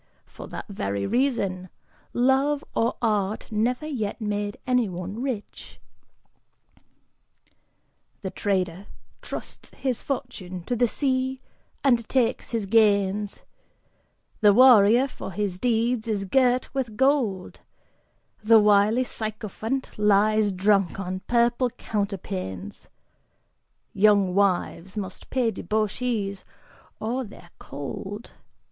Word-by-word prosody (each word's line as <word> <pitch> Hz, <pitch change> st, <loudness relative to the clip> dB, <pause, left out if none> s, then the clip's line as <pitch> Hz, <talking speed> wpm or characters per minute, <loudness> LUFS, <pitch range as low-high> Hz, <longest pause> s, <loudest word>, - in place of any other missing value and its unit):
For -, -, -11 dB
that -, -, -7 dB
very 100 Hz, -, -3 dB
reason; 200 Hz, -, 0 dB, 0.4 s
love 270 Hz, +4 st, +2 dB
or 230 Hz, +1 st, +1 dB
art 210 Hz, -2 st, 0 dB
never 240 Hz, +7 st, 0 dB
yet 240 Hz, -10 st, -3 dB
made 205 Hz, -1 st, -2 dB
anyone 205 Hz, -4 st, -1 dB
rich." 250 Hz, -6 st, -6 dB, 2.4 s
The 190 Hz, -, -3 dB
trader 190 Hz, -2 st, -2 dB, 0.3 s
trusts -, -, -8 dB
his 255 Hz, -4 st, -2 dB
fortune 215 Hz, -10 st, -5 dB
to 245 Hz, -, -2 dB
the 240 Hz, +1 st, +3 dB
sea 260 Hz, +1 st, -1 dB, 0.4 s
and 240 Hz, -5 st, +2 dB
takes 250 Hz, -4 st, +1 dB
his 225 Hz, -3 st, -2 dB
gains, 205 Hz, -1 st, +2 dB, 1.0 s
The 205 Hz, -2 st, +5 dB
warrior, 245 Hz, 0 st, +7 dB
for 195 Hz, -, -8 dB
his 195 Hz, -2 st, -2 dB
deeds, 235 Hz, 0 st, +1 dB
is 205 Hz, -3 st, -1 dB
girt 255 Hz, +3 st, +2 dB
with 245 Hz, -6 st, -3 dB
gold; 255 Hz, -9 st, +1 dB, 0.8 s
The 225 Hz, +1 st, +7 dB
wily 210 Hz, +3 st, +4 dB
sycophant 220 Hz, +2 st, -4 dB
lies 210 Hz, 0 st, +3 dB
drunk 195 Hz, -1 st, +2 dB
on 185 Hz, -1 st, -3 dB
purple 240 Hz, +1 st, +2 dB
counterpanes, 190 Hz, -, -5 dB, 1.0 s
Young 200 Hz, -2 st, +4 dB
wives 190 Hz, -1 st, 0 dB
must 190 Hz, -3 st, -6 dB
pay 245 Hz, -3 st, +1 dB
debauchees 215 Hz, -2 st, -2 dB, 0.6 s
or 245 Hz, +4 st, -2 dB
they're 190 Hz, -6 st, -13 dB
cold. 195 Hz, -, -7 dB
215 Hz, 100 wpm, -25 LUFS, 195-245 Hz, 2.4 s, warrior